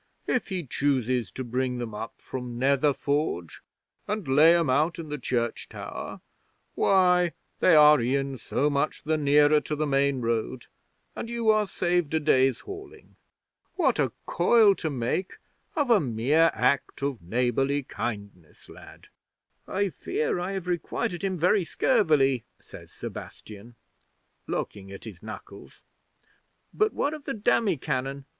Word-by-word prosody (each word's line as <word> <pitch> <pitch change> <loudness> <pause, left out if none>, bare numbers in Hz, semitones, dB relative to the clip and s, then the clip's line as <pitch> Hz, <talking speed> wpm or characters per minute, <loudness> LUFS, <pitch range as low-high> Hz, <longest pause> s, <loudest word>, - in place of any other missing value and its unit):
If 250 - 0
he 185 -4 -3
chooses 130 -5 0
to 130 - -5
bring 125 +1 -2
them 120 -3 -5
up 110 +2 -6
from 125 -2 -6
Nether 140 +3 +3
Forge 140 - -2 0.5
and 210 -6 -3
lay 155 +6 +6
'em 165 -2 +1
out 150 +7 +1
in 165 -3 -7
the 150 0 -4
church 120 -2 -2
tower, - - -7 0.5
why, 180 -3 +3 0.3
they - - +5
are 150 -2 +7
e'en 135 +2 -1
so 140 +5 0
much 145 +1 -1
the 155 +1 0
nearer 150 0 +4
to 150 - -4
the 155 +1 -1
main 140 -1 +1
road 115 +2 -2 0.5
and 230 - -5
you 235 -2 +2
are 215 -1 +2
saved 175 -4 0
a - - +3
day's 135 -4 +2
hauling. 400 +1 -11 0.6
What 270 - +1
a 135 -5 +1
coil 210 +3 +4
to 160 - -2
make 135 +7 -2 0.4
of 290 -6 +1
a 225 - +6
mere 140 +5 +2
act 130 +4 0
of 140 -5 -2
neighbourly 125 +8 0
kindness, 100 -10 -7
lad!" - - -14 0.6
'"I 200 +1 0
fear 155 +1 -2
I 180 +2 -3
have 190 -2 -5
requited 175 +2 -2
him 190 -2 -1
very 180 +4 +3
scurvily," 150 - +2 0.2
says - - -14
Sebastian, 110 +3 -10 0.7
looking 95 -1 -4
at 100 - -10
his 100 -6 -10
knuckles. 110 0 -11 0.9
"But 430 0 +2
what 285 - -1
of 305 -2 -9
the 275 - -3
demi 210 -4 +1
cannon? 135 +2 -3
145 Hz, 150 wpm, -26 LUFS, 125-180 Hz, 0.9 s, are